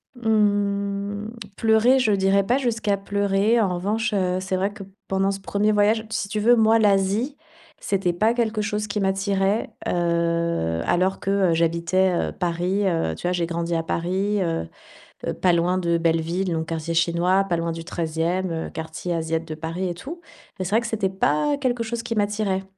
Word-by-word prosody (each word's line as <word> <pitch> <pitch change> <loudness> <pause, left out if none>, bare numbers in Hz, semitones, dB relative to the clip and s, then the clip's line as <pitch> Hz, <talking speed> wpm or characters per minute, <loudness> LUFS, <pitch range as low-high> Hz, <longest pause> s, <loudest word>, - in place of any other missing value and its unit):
Mmh, 205 -2 0 0.3
pleurer, 225 +4 +4
je 235 -4 +2
dirais 195 0 +3
pas 245 +5 +2
jusqu'à 220 -5 0
pleurer. 200 +3 +1
En 185 -4 +1
revanche, 215 +4 -1
heu, 185 -2 +1
c'est 185 0 -2
vrai 195 +2 0
que 205 -1 -9 0.2
pendant 195 0 +1
ce 195 - -5
1er 205 +2 0
voyage 215 +2 +2
si 205 - -2
tu 210 +1 -2
veux, 240 +3 +5
moi, 225 0 +4
l'Asie, 210 +5 +2 0.4
c'était 190 -3 0
pas 215 +6 +2
quelque 225 -3 0
chose 210 0 -2
qui 205 0 -2
m'attirait. 195 +1 0 0.2
Heu, 170 - 0
alors 185 +2 +1
que, 195 - -2 0.2
heu, - - +3
j'habitais, 170 +3 +2 0.2
heu, - - -6
Paris, 180 +3 -1
heu. 165 - 0
Tu - - -12
vois, 180 - +1
j'ai 175 -2 0
grandi 170 0 -2
à 165 - +1
Paris, 190 +5 -1
heu, 165 - -2 0.7
pas 180 - +4
loin 175 +2 +2
de 170 -2 +1
Belleville, 165 +3 0
donc 160 -1 -2
quartier 165 0 -3
chinois, 170 +3 +2
pas 180 -3 -1
loin 165 0 -2
du 165 0 -6
13e 170 +2 -2
heu, 165 -1 -4
quartier 160 +2 -5
asiat 165 0 -1
de 160 -1 -7
Paris 165 +4 -3
et 175 - -3
tout. 295 - -8 0.4
Mais 185 - -2
c'est 180 - -4
vrai 225 - +4
que 230 - -5
c'était 215 -4 0
pas 190 - +1
quelque 245 -4 -1
chose 230 +1 -4
qui 230 -1 -4
m'attirait. 205 -2 0
195 Hz, 185 wpm, -23 LUFS, 170-210 Hz, 0.7 s, veux